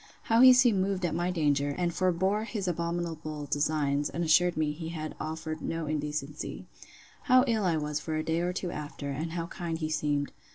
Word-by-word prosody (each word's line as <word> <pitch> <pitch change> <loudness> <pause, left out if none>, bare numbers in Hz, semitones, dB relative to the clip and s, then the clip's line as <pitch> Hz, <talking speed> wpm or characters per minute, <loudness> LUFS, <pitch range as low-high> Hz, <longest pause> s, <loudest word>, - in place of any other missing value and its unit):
How 225 +1 +3
he 260 0 +10
seemed 245 -6 +5
moved 190 -1 -1
at 170 - -1
my 175 +2 0
danger, 145 -4 +1
and 175 -1 0
forbore 190 +4 +1
his 210 -5 -4
abominable 170 -3 -3
designs; 145 0 0
and 170 - -3
assured 170 +2 +4
me 155 -1 +1
he 160 +2 -6
had 155 -2 -5
offered 160 0 -4
no 165 -1 -3
indecency. 150 -1 -4 0.6
How 255 0 +6
ill 225 -5 +1
I 170 -3 +2
was 150 -1 -2
for 155 +1 -4
a 155 - -1
day 160 +1 0
or 175 +1 0
two 180 -1 -3
after; 145 -1 -5
and 160 +4 -4
how 170 -1 -2
kind 170 -1 -4
he 155 -1 -3
seemed. 145 -2 0
160 Hz, 200 wpm, -29 LUFS, 150-180 Hz, 0.6 s, he